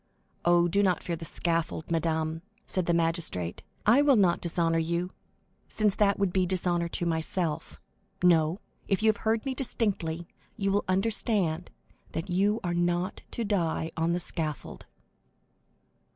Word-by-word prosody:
"Oh, 175 0 +5
do 200 +4 +2
not 185 -3 +1
fear 170 - -2
the 165 - -8
scaffold, 165 -1 -2
madame," 160 -1 0 0.2
said 185 -2 -1
the 170 - +3
magistrate; 165 - -1 0.2
"I 235 +7 +6
will 290 -2 +5
not 185 -5 +3
dishonor 165 -1 +1
you, 170 +2 -1 0.6
since 210 -2 +2
that 200 -1 +2
would 195 -3 0
be 185 -1 +2
dishonor 175 -2 0
to 175 - -2
myself; 160 -1 -2 0.4
no, 165 0 +4 0.3
if 195 +2 0
you 220 - +6
have 215 - +2
heard 220 +2 0
me 270 - -1
distinctly, 185 -10 -2 0.3
you 195 -2 0
will 205 +1 +1
understand 190 -3 +1 0.4
that 165 +3 -4
you 200 +5 +2
are 175 -1 -1
not 175 +2 0
to 235 - -3
die 170 -6 0
on 165 +1 +1
the 175 - 0
scaffold." 160 -3 -5
175 Hz, 150 wpm, -28 LUFS, 165-200 Hz, 0.6 s, I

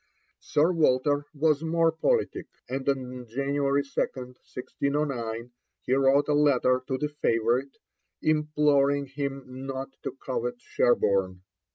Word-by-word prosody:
Sir 155 +4 +2
Walter 145 -2 +2
was 155 0 +1
more 165 0 +2
politic, 445 - 0 0.2
and 135 +1 -2
on 125 -2 -3
January 140 +3 0
2, - - -18
1609, 125 -1 -3 0.3
he 125 - 0
wrote 135 +1 +4
a 150 - +2
letter 130 -3 +3
to 130 - -1
the 150 +2 -2
favourite, 120 +4 +1 0.4
imploring 150 -2 +2
him 140 0 -4 0.2
not 135 0 -4
to - - -4
covet 120 -1 -2
Sherborne. 95 -7 +1
140 Hz, 120 wpm, -27 LUFS, 125-145 Hz, 0.4 s, wrote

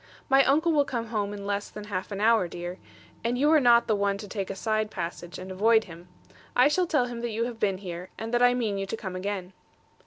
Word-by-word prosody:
'My 270 0 +6
uncle 315 +5 +3
will 295 -2 +4
come 235 -4 -4
home 205 -3 -1
in 200 -1 -7
less 200 0 -2
than 210 - -8
half 200 -1 -4
an 200 - -4
hour, 220 -3 +4
dear: 175 +2 -6 0.4
and 235 +2 0
you 295 +4 +3
are 315 - +6
not 240 -3 +5
the 215 - +1
one 200 -1 0
to 205 0 -8
take 195 -2 -4
a 195 - -4
side 215 +1 -1
passage, 175 -2 -6
and 185 +1 -8
avoid 220 +4 +4
him. 170 -1 -12 0.5
I 255 +3 +6
shall 360 +4 +1
tell 295 -6 +2
him 240 -1 -6
that 240 - -2
you 225 +1 -1
have 235 -1 -5
been 195 -3 +1
here; 180 -1 -7
and 225 +2 -5
that 240 - +3
I 245 0 +5
mean 215 -5 -1
you 195 - -3
to 225 - -4
come 190 -4 -6
again.' 190 -1 -4
215 Hz, 255 wpm, -27 LUFS, 195-240 Hz, 0.5 s, My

